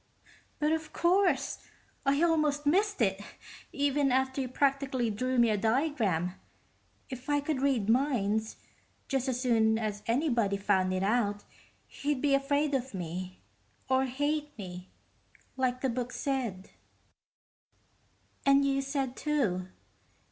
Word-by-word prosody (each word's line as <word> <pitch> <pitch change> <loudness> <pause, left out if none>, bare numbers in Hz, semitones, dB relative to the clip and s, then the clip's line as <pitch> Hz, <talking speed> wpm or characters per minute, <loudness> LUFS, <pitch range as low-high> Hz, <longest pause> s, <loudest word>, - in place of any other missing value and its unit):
"But 300 0 +1
of 315 -1 -2
course. 345 -6 +2 0.5
I 280 +4 +3
almost 305 -3 +2
missed 390 - +2
it, 195 -1 0 0.5
even 285 -1 +1
after 265 +1 +1
you 260 - -2
practically 265 -2 0
drew 255 +5 -1
me 235 -2 +5
a 210 - +1
diagram. 220 - 0 0.8
If 255 +2 -7
I 290 0 +3
could 285 -2 -2
read 265 -7 +1
minds, 220 -4 +1 0.5
just 270 -1 -1
as 250 -1 -1
soon 225 -3 +3
as 210 -2 -3
anybody 235 -6 +1
found 190 -2 +1
it 185 0 -1
out, 205 -1 +1 0.4
he'd 290 -1 -2
be 285 +1 +2
afraid 285 +2 +1
of 260 -4 -2
me, 180 - -6 0.5
or 260 0 +3
hate 290 +3 -2
me, 180 -2 -8 0.7
like 255 -1 0
the 265 - +1
book 250 +1 -3
said, 245 -11 -3 1.7
and 275 0 +5
you 275 0 +1
said, 270 -2 -2
too. 215 -13 0
260 Hz, 130 wpm, -30 LUFS, 220-285 Hz, 1.7 s, me